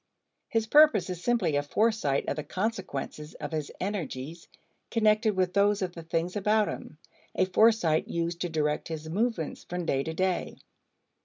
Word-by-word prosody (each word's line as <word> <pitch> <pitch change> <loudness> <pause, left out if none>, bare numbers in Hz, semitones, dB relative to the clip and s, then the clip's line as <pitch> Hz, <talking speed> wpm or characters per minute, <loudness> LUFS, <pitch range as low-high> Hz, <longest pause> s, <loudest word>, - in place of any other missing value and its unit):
His 225 -1 +1
purpose 220 - +5
is 180 -1 -6
simply 225 -11 +1
a 145 - +2
foresight 205 -3 +1
of - - 0
the 150 - -4
consequences 180 -5 -4
of - - -6
his 155 -2 -3
energies 165 -5 -4 0.4
connected 215 -1 +3
with 185 -1 +1
those 200 0 +3
of 180 -2 -3
the 170 - -8
things 165 +3 -2
about 210 +1 +2
him, 150 - -7 0.4
a - - +3
foresight 185 -5 +3
used 170 0 -2
to 175 - -1
direct 150 -2 -1
his 160 -1 -6
movements 195 -1 -2
from 180 -1 -4
day 135 -4 +1
to 160 +3 -4
day. 185 0 -1
180 Hz, 165 wpm, -28 LUFS, 160-215 Hz, 0.4 s, purpose